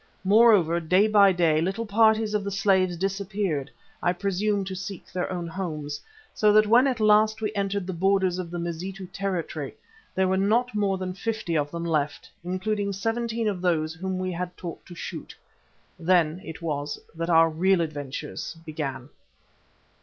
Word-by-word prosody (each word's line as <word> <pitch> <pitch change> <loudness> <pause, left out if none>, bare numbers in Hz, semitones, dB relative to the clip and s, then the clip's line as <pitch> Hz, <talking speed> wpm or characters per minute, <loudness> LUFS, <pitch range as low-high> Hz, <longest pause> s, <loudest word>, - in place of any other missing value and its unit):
Moreover, 200 -5 +5
day 180 +5 +3
by 205 -2 +6
day 165 -4 +2
little 195 +7 -1
parties 220 0 +3
of 210 -1 0
the 200 - -3
slaves 190 -2 +2
disappeared, 195 -5 -2 0.3
I 175 - +2
presume 200 +2 0
to 190 - -5
seek 190 0 -7
their 180 0 -2
own 175 -2 -3
homes, 155 -4 -5 0.3
so 210 -1 +4
that 215 0 +6
when 240 +5 +5
at 255 -3 -1
last 215 0 +4
we 215 -1 -2
entered 200 -1 -1
the 185 - -4
borders 190 0 +1
of 175 -2 -4
the 175 - -5
Mazitu 175 +3 -5
country 170 -7 -3 0.4
there 190 0 +2
were 190 +1 +1
not 225 +5 +2
more 200 -2 +1
than 185 -1 -4
fifty 220 -4 -3
of 145 -2 +1
them 170 +2 -5
left, 150 -3 -1
including 200 +3 -2
seventeen 225 +2 -1
of 195 -4 -2
those 160 -3 +1
whom 185 +3 -4
we 185 0 -2
had 180 +1 -5
taught 170 -3 -7
to 175 - -10
shoot. - - -7 0.6
Then 170 -1 +2
it 160 +1 -9
was 145 -2 -2 0.2
that 165 +1 -4
our 165 -1 +5
real 185 +4 +2
adventures 150 0 -5
began. 140 -5 -4
185 Hz, 170 wpm, -26 LUFS, 165-205 Hz, 0.6 s, by